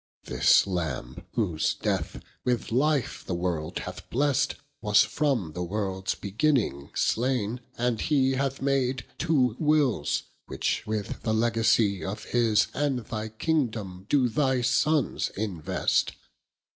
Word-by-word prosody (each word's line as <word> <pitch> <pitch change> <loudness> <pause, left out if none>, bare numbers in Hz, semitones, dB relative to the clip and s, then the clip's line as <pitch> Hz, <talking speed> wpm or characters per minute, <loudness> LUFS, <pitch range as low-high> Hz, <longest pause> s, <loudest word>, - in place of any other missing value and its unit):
This - - +4
Lambe, 80 -3 -4
whose 90 -9 0
death, - - -2 0.2
with 125 -3 -1
life 140 +2 +1
the 90 - -3
world 85 -3 -2
hath - - -7
blest, 140 +2 +1 0.3
Was 105 -2 +5
from 125 - -1
the 90 - -4
worlds 95 0 -2
beginning 105 - 0
slaine, 120 -1 0 0.2
and 120 -2 0
he 135 -4 +2
Hath 135 0 -1
made 135 -2 +1
two 135 -8 +2
Wills, 150 - +2 0.2
which - - -2
with 105 -2 -3
the 110 -1 0
Legacie 110 -4 +2
Of 95 +6 -4
his 115 -3 +3
and 135 -5 -1
thy 110 0 -4
kingdome, 110 - -2
doe 135 -4 +4
thy 130 0 +1
Sonnes 135 +4 +1
invest. 95 -7 0
115 Hz, 125 wpm, -27 LUFS, 100-135 Hz, 0.3 s, Was